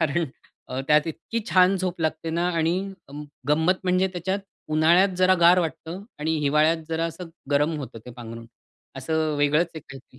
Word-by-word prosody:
कारण 160 Hz, +3 st, +1 dB, 0.4 s
अ, 130 Hz, +1 st, -3 dB
त्यात 150 Hz, +1 st, +4 dB
इतकी 230 Hz, +8 st, -4 dB
छान 185 Hz, +1 st, +5 dB
झोप 180 Hz, -2 st, -3 dB
लागते 160 Hz, 0 st, -1 dB
ना 170 Hz, +2 st, 0 dB
आणि 165 Hz, +1 st, +1 dB, 0.3 s
अं, 145 Hz, +2 st, -8 dB, 0.3 s
गंमत 160 Hz, +5 st, +3 dB
म्हणजे 185 Hz, +1 st, +2 dB
त्याच्यात 190 Hz, +2 st, -2 dB, 0.3 s
उन्हाळ्यात 170 Hz, +5 st, +5 dB
जरा 185 Hz, 0 st, +5 dB
गार 175 Hz, +2 st, +7 dB
वाटतं 170 Hz, +2 st, -4 dB, 0.2 s
आणि 160 Hz, +2 st, 0 dB
हिवाळ्यात 150 Hz, +3 st, +3 dB
जरा 165 Hz, 0 st, -1 dB
असं 165 Hz, +1 st, -6 dB, 0.2 s
गरम 145 Hz, +3 st, +2 dB
होतं 130 Hz, -5 st, -7 dB
ते -, -, -7 dB
पांघरूण 115 Hz, -1 st, -9 dB, 0.5 s
असं 155 Hz, +3 st, -1 dB
वेगळंच 145 Hz, +4 st, +3 dB
आहे 160 Hz, -, -6 dB
काहीतरी 135 Hz, -2 st, -14 dB
160 Hz, 170 wpm, -24 LUFS, 150-175 Hz, 0.5 s, गार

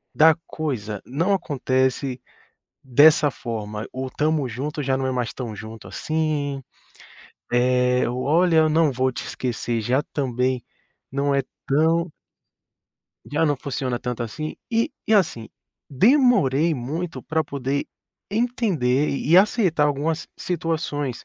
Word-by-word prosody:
da 160 Hz, 0 st, +6 dB
coisa, 110 Hz, -10 st, -4 dB
não 165 Hz, +10 st, 0 dB
acontece 130 Hz, -5 st, 0 dB, 0.6 s
dessa 145 Hz, +3 st, +5 dB
forma. 110 Hz, -4 st, -5 dB
O 130 Hz, 0 st, -4 dB
"Tamo 150 Hz, -2 st, 0 dB
junto" 145 Hz, +6 st, -4 dB
já 130 Hz, -1 st, +1 dB
não 135 Hz, -, -1 dB
é 130 Hz, -, -1 dB
mais 125 Hz, -2 st, -2 dB
tão 120 Hz, -4 st, -5 dB
junto, 110 Hz, -1 st, -9 dB
assim, 145 Hz, +3 st, -2 dB, 0.9 s
é, 125 Hz, 0 st, +3 dB
o 125 Hz, +1 st, -3 dB
"Olha, 165 Hz, +4 st, +3 dB
eu 155 Hz, 0 st, +5 dB
não 155 Hz, -1 st, +3 dB
vou 130 Hz, +1 st, +1 dB
te -, -, -6 dB
esquecer" 120 Hz, -2 st, -2 dB
já 125 Hz, +6 st, +1 dB
também 130 Hz, -2 st, 0 dB, 0.5 s
não 140 Hz, +1 st, +1 dB
é 140 Hz, -, +2 dB, 0.2 s
tão 160 Hz, +4 st, +2 dB, 1.2 s
já 155 Hz, +3 st, 0 dB
não 145 Hz, -2 st, +2 dB
funciona 130 Hz, -2 st, -3 dB
tanto, 125 Hz, -1 st, -4 dB
assim. 155 Hz, +7 st, -5 dB
E 230 Hz, 0 st, +1 dB, 0.2 s
e, 220 Hz, -, +1 dB
assim, 155 Hz, -, +1 dB, 0.4 s
demorei 165 Hz, -, +4 dB
muito 155 Hz, +7 st, -4 dB
pra 160 Hz, 0 st, -1 dB
poder 140 Hz, -1 st, -2 dB, 0.5 s
entender 195 Hz, -, +1 dB
e 150 Hz, +4 st, +2 dB
aceitar 185 Hz, -6 st, +4 dB
algumas 150 Hz, +3 st, -1 dB
situações, 155 Hz, -6 st, -3 dB
140 Hz, 130 wpm, -23 LUFS, 125-160 Hz, 1.2 s, da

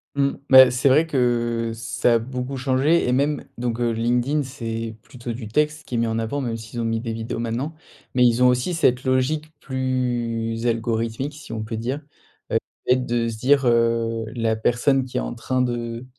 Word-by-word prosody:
Mmh, 140 Hz, 0 st, +2 dB
bah, 130 Hz, -1 st, +9 dB
c'est 125 Hz, +3 st, +2 dB
vrai 155 Hz, +5 st, +4 dB
que 120 Hz, -4 st, 0 dB
ça 120 Hz, +1 st, 0 dB
a -, -, +3 dB
beaucoup 125 Hz, +3 st, -5 dB
changé 135 Hz, +5 st, +2 dB
et 125 Hz, -, +2 dB
même 140 Hz, +3 st, +1 dB
donc, 120 Hz, -1 st, -2 dB
heu, 120 Hz, -, +1 dB
LinkedIn 120 Hz, +6 st, +1 dB
c'est 115 Hz, -4 st, -5 dB
plutôt 120 Hz, -1 st, -7 dB
du 115 Hz, -2 st, -7 dB
texte 150 Hz, +6 st, 0 dB
qui 125 Hz, -, -4 dB
est -, -, +1 dB
mis 115 Hz, -, +2 dB
en 115 Hz, 0 st, -1 dB
avant, 115 Hz, +6 st, -2 dB
même 120 Hz, -4 st, -2 dB
s'ils 115 Hz, +1 st, -7 dB
ont -, -, -1 dB
mis 115 Hz, 0 st, 0 dB
des 115 Hz, -1 st, -4 dB
vidéos, 115 Hz, +1 st, -4 dB
maintenant, 120 Hz, +7 st, -2 dB, 0.4 s
mais 125 Hz, 0 st, +4 dB
ils 120 Hz, +1 st, +4 dB
ont -, -, +7 dB
aussi 125 Hz, +8 st, +1 dB
cette 130 Hz, -5 st, +2 dB
logique 140 Hz, +4 st, 0 dB
plus 120 Hz, -3 st, -2 dB
algorithmique, 115 Hz, +4 st, -1 dB
si 145 Hz, 0 st, -11 dB
on 110 Hz, -1 st, -3 dB
peut 110 Hz, +1 st, -5 dB
dire, 125 Hz, +6 st, -2 dB, 0.5 s
heu, -, -, +3 dB, 0.3 s
le -, -, +1 dB
fait 130 Hz, -, +6 dB
de 120 Hz, -1 st, 0 dB
se 115 Hz, -1 st, -4 dB
dire, 135 Hz, +2 st, +3 dB
heu: 115 Hz, -1 st, +2 dB
«La 115 Hz, -1 st, +1 dB
personne 125 Hz, +4 st, +2 dB
qui 130 Hz, -, -5 dB
est -, -, +2 dB
en -, -, -3 dB
train 130 Hz, 0 st, -1 dB
de 120 Hz, 0 st, -3 dB
120 Hz, 210 wpm, -23 LUFS, 115-130 Hz, 0.5 s, bah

